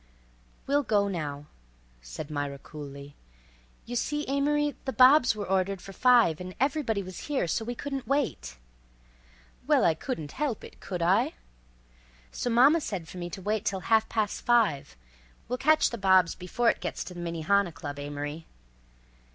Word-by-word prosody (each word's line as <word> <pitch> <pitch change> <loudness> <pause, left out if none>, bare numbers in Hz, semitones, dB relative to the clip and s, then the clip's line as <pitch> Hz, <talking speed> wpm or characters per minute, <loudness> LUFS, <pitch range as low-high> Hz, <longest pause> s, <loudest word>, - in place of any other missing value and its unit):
"We'll 285 +1 +2
go 210 -5 +1
now," 150 -6 -4 0.6
said - - -8
Myra 145 -1 -3
coolly. 140 0 -10 0.7
"You 245 - -6
see, 295 +5 -1
Amory, 290 +2 +1
the 265 - -1
bobs 260 -1 +6
were 205 -1 -4
ordered 190 0 0
for 195 +2 -11
five 235 -9 +4
and 185 0 -7
everybody 260 -6 0
was 185 -1 -8
here, 285 -9 0
so 225 - -1
we 240 +2 -4
couldn't 275 0 -5
wait—" 265 - -1 1.1
"Well, - - +4
I 165 - +4
couldn't 160 - -5
help 275 -6 -3
it, - - -12
could 180 -3 -4
I?" 215 - +2 1.0
"So 245 - -3
mama 270 +8 +5
said 190 - -5
for 180 - -9
me 175 0 -4
to 190 +2 -8
wait 215 +1 -1
till 195 -5 -2
ha'past 220 -1 +1
five. 225 - +2 0.5
We'll 250 +2 -3
catch 310 +2 +4
the 235 - -5
bobs 190 -3 +4
before 230 +6 +1
it - - -10
gets - - -4
to 180 - -9
the 175 - -9
Minnehaha 175 +3 +1
Club, 145 -2 -7
Amory." 145 +2 -6
200 Hz, 160 wpm, -28 LUFS, 165-250 Hz, 1.1 s, bobs